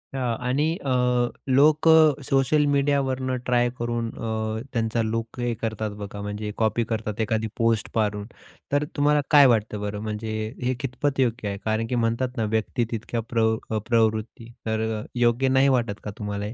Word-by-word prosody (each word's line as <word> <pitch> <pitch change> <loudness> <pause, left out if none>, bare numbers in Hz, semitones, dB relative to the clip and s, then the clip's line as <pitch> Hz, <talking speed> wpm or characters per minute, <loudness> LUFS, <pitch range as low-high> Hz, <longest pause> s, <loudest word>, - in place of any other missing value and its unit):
हां. 125 -3 -1
आणि 135 +4 +1 0.2
अ, 130 - 0 0.6
लोकं 155 +1 +5
सोशल 135 +2 +3
मीडियावरून 135 -2 +1
ट्राय 120 -1 +2
करून 120 -1 -2
अ, 110 -1 -3
त्यांचा 115 0 0
लूक 115 +2 -3
हे 120 -1 0
करतात 110 -1 -2
बघा, 100 0 -6
म्हणजे 105 +1 -4
कॉपी 110 +1 +1
करतात 110 -1 -3
एखादी 110 0 0
पोस्ट 115 -1 +1
पाहून 105 -2 0 0.5
तर 145 +1 +2
तुम्हाला 145 0 +3
काय 145 -2 +8
वाटतं 110 -3 +1
बरं, 105 0 -3
म्हणजे 110 0 -4 0.3
हे 130 +1 +1
कितपत 135 +2 -2
योग्य 120 -4 0
आहे 100 - -4
कारण 110 +1 0
की 125 - -2
म्हणतात 120 +2 -1
ना 115 - +1
व्यक्ती 115 +2 0
तितक्या 115 +1 -3
प्रव 110 -1 +2
अ, 110 - -1
प्रवृत्ती, 115 0 0
तर 110 -1 -1
योग्य 120 +2 +2
नाही 135 +1 +4
वाटत 120 -6 0
का 105 - -5
तुम्हाला 105 -1 -4
हे? 105 - -5
115 Hz, 165 wpm, -24 LUFS, 110-130 Hz, 0.6 s, काय